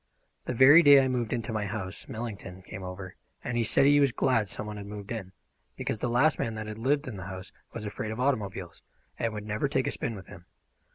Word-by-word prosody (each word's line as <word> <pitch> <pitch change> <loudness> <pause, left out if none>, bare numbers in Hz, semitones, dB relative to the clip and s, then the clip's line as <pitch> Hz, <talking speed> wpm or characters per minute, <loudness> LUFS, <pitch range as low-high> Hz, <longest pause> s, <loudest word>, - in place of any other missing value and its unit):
The 125 - -3
very 140 +7 +9
day 145 -3 +8
I 135 - +3
moved 125 -3 -1
into 115 0 -2
my 105 -1 -1
house 95 -2 -5
Millington 100 -5 -7
came 95 - -8
over 90 0 -7 0.3
and 120 -1 0
said 135 - +4
he 145 +1 +6
was 140 -2 +4
glad 115 -5 +1
some 105 - -5
one 105 0 -6
had 100 -1 -7
moved 105 0 -8
in, 100 -5 -5 0.4
because 110 - -3
the 120 - -1
last 135 +6 +3
man 115 -1 -2
that 110 0 -5
had 110 0 -7
lived 140 +4 +1
in 115 -6 -6
the 95 0 -7
house 95 0 -8 0.2
was 110 -2 -6
afraid 105 +1 -4
of 110 +2 -5
automobiles, 100 -9 -2 0.4
and 115 - 0
would 105 -1 -6
never 105 +6 -1
take 130 -2 0
a - - 0
spin 115 - -3
with 95 - -10
him. 90 -1 -13
110 Hz, 235 wpm, -28 LUFS, 100-125 Hz, 0.4 s, very